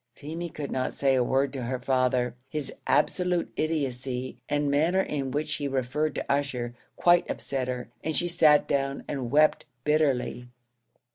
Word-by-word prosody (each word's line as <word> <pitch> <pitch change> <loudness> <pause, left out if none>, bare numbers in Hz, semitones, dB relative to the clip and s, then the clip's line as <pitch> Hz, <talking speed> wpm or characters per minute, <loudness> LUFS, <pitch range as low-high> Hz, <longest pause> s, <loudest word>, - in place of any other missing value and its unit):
Feemy 165 +4 -5
could 150 -3 -6
not 130 - -1
say 135 -1 +2
a 130 -1 +3
word 135 +2 +1
to 135 - -4
her 125 +2 -2
father: 125 -1 +1 0.2
his 150 -1 -3
absolute 180 -2 +1
idiotcy, 130 -5 -2
and 145 0 +1
the - - +1
manner 165 +7 +3
in 140 -7 -2
which 150 +4 -2
he 145 - -2
referred 135 +3 -1
to - - -3
Ussher, 135 -4 -1 0.2
quite 175 0 +4
upset 130 -2 -2
her, 125 -1 -3 0.2
and 160 -1 -1
she 175 - +2
sat 155 -4 +5
down 135 0 -1
and 130 -4 -3
wept 150 +4 +4 0.2
bitterly. 140 -5 +1
140 Hz, 165 wpm, -27 LUFS, 130-155 Hz, 0.2 s, sat